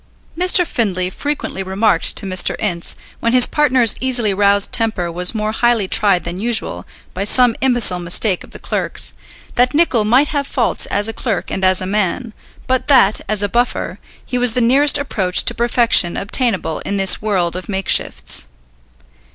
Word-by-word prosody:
Mr. 360 Hz, +1 st, +3 dB
Findlay 185 Hz, -, -2 dB
frequently 290 Hz, -5 st, -5 dB
remarked 190 Hz, -1 st, +1 dB
to -, -, -2 dB
Mr. 185 Hz, -1 st, +1 dB
Ince, 175 Hz, -5 st, -2 dB, 0.2 s
when 230 Hz, +1 st, -1 dB
his 250 Hz, -1 st, +6 dB
partner's 260 Hz, -6 st, +2 dB
easily 245 Hz, -5 st, 0 dB
roused 200 Hz, 0 st, +1 dB
temper 215 Hz, -7 st, -2 dB
was 180 Hz, +5 st, -3 dB
more 215 Hz, 0 st, -2 dB
highly 230 Hz, -3 st, 0 dB
tried 195 Hz, -2 st, +1 dB
than 175 Hz, +2 st, -6 dB
usual 230 Hz, +1 st, -2 dB, 0.3 s
by 190 Hz, -, -4 dB
some 245 Hz, +2 st, +3 dB
imbecile 245 Hz, -8 st, +2 dB
mistake 180 Hz, +2 st, -1 dB
of -, -, -15 dB
the -, -, -12 dB
clerk's, -, -, -4 dB, 0.4 s
that 250 Hz, +3 st, +1 dB
Nicol 290 Hz, -9 st, +2 dB
might 255 Hz, +7 st, +2 dB
have 285 Hz, -2 st, -3 dB
faults 240 Hz, -3 st, 0 dB
as 205 Hz, +1 st, -1 dB
a 225 Hz, -, -4 dB
clerk 220 Hz, -6 st, -4 dB
and 190 Hz, -, -4 dB
as 185 Hz, 0 st, +3 dB
a -, -, -4 dB
man, 210 Hz, +4 st, -2 dB, 0.3 s
but 260 Hz, +1 st, -1 dB
that, 250 Hz, -8 st, +3 dB
as 210 Hz, -1 st, 0 dB
a -, -, +1 dB
buffer, 240 Hz, +4 st, -2 dB, 0.3 s
he 250 Hz, -, -3 dB
was 245 Hz, -2 st, +2 dB
the 250 Hz, -, 0 dB
nearest 275 Hz, +5 st, +3 dB
approach 195 Hz, -10 st, 0 dB
to -, -, +1 dB
perfection 235 Hz, -7 st, +2 dB
obtainable 200 Hz, -, -2 dB
in 200 Hz, -, -4 dB
this 195 Hz, -1 st, +4 dB
world 185 Hz, -5 st, -1 dB
of 185 Hz, +1 st, -8 dB
makeshifts. 190 Hz, -, +1 dB
215 Hz, 175 wpm, -16 LUFS, 190-245 Hz, 0.4 s, his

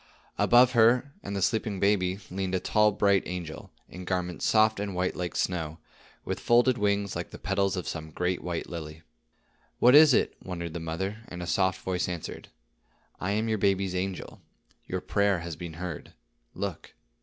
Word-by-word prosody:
Above 125 Hz, +1 st, +6 dB
her 125 Hz, +3 st, +4 dB
and 100 Hz, 0 st, -5 dB
the 100 Hz, -, 0 dB
sleeping 105 Hz, -1 st, 0 dB
baby 95 Hz, -2 st, +2 dB
leaned 95 Hz, 0 st, -2 dB
a -, -, +1 dB
tall 105 Hz, +3 st, +3 dB
bright 100 Hz, -2 st, +3 dB
angel, 85 Hz, -3 st, -6 dB, 0.2 s
in 90 Hz, -, -9 dB
garments 90 Hz, -1 st, -2 dB
soft 110 Hz, -1 st, +4 dB
and 100 Hz, -2 st, -3 dB
white 90 Hz, +1 st, -1 dB
like 90 Hz, -1 st, -4 dB
snow, 80 Hz, -4 st, -2 dB, 0.5 s
with -, -, -3 dB
folded 120 Hz, +2 st, +4 dB
wings 100 Hz, -2 st, 0 dB
like -, -, -4 dB
the -, -, -10 dB
petals 100 Hz, -1 st, 0 dB
of 90 Hz, -, -4 dB
some 80 Hz, 0 st, -5 dB
great 90 Hz, +3 st, -2 dB
white 85 Hz, -2 st, -3 dB
lily. 80 Hz, -1 st, -7 dB, 0.7 s
"What 125 Hz, +1 st, +6 dB
is 150 Hz, 0 st, +9 dB
it," -, -, +2 dB
wondered 85 Hz, -3 st, -5 dB
the 85 Hz, -, -4 dB
mother; 90 Hz, +6 st, -3 dB
and 90 Hz, 0 st, -7 dB
a -, -, -4 dB
soft 95 Hz, +1 st, +1 dB
voice 90 Hz, -1 st, -1 dB
answered: 85 Hz, -3 st, -6 dB, 0.7 s
"I 95 Hz, +2 st, -1 dB
am 110 Hz, +2 st, 0 dB
your 110 Hz, -1 st, 0 dB
baby's 95 Hz, -1 st, +1 dB
angel. 95 Hz, 0 st, -4 dB, 0.5 s
Your -, -, -3 dB
prayer 100 Hz, -3 st, +1 dB
has 85 Hz, -1 st, -5 dB
been 85 Hz, +1 st, -7 dB
heard. 85 Hz, +1 st, -7 dB, 0.4 s
Look." -, -, -5 dB
95 Hz, 180 wpm, -28 LUFS, 90-105 Hz, 0.7 s, is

